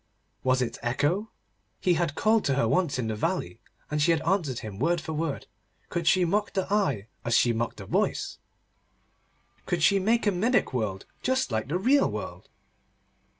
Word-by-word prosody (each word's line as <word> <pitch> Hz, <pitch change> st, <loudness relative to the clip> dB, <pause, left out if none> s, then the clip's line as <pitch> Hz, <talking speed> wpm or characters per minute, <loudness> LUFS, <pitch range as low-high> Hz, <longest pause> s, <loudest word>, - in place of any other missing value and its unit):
Was 130 Hz, 0 st, +3 dB
it 120 Hz, -, -5 dB
Echo? 145 Hz, -, 0 dB, 0.5 s
He 180 Hz, -, +2 dB
had 165 Hz, -3 st, 0 dB
called 220 Hz, +3 st, +3 dB
to 140 Hz, -, +2 dB
her 140 Hz, -, +2 dB
once 175 Hz, -7 st, +1 dB
in 125 Hz, -, -1 dB
the 110 Hz, -, -2 dB
valley, 110 Hz, -, -2 dB, 0.3 s
and 150 Hz, 0 st, 0 dB
she 145 Hz, -, +3 dB
had 165 Hz, -2 st, +2 dB
answered 165 Hz, -, 0 dB
him 100 Hz, -2 st, -7 dB
word 175 Hz, +1 st, +2 dB
for 160 Hz, 0 st, -5 dB
word. 155 Hz, -2 st, -2 dB, 0.4 s
Could 170 Hz, -1 st, -2 dB
she 185 Hz, -1 st, +5 dB
mock 205 Hz, +5 st, 0 dB
the 190 Hz, -, 0 dB
eye, 145 Hz, -, +1 dB, 0.2 s
as 115 Hz, 0 st, +3 dB
she 120 Hz, -, +3 dB
mocked 115 Hz, +1 st, -2 dB
the -, -, -8 dB
voice? -, -, -1 dB, 1.3 s
Could 175 Hz, -3 st, 0 dB
she 195 Hz, +4 st, +5 dB
make 225 Hz, +5 st, +2 dB
a 205 Hz, -, +4 dB
mimic 225 Hz, -, +1 dB
world 105 Hz, -6 st, -2 dB, 0.2 s
just 260 Hz, -, 0 dB
like 110 Hz, +1 st, -1 dB
the 160 Hz, +6 st, 0 dB
real 265 Hz, +9 st, +3 dB
world? -, -, -7 dB
165 Hz, 185 wpm, -27 LUFS, 125-195 Hz, 1.3 s, she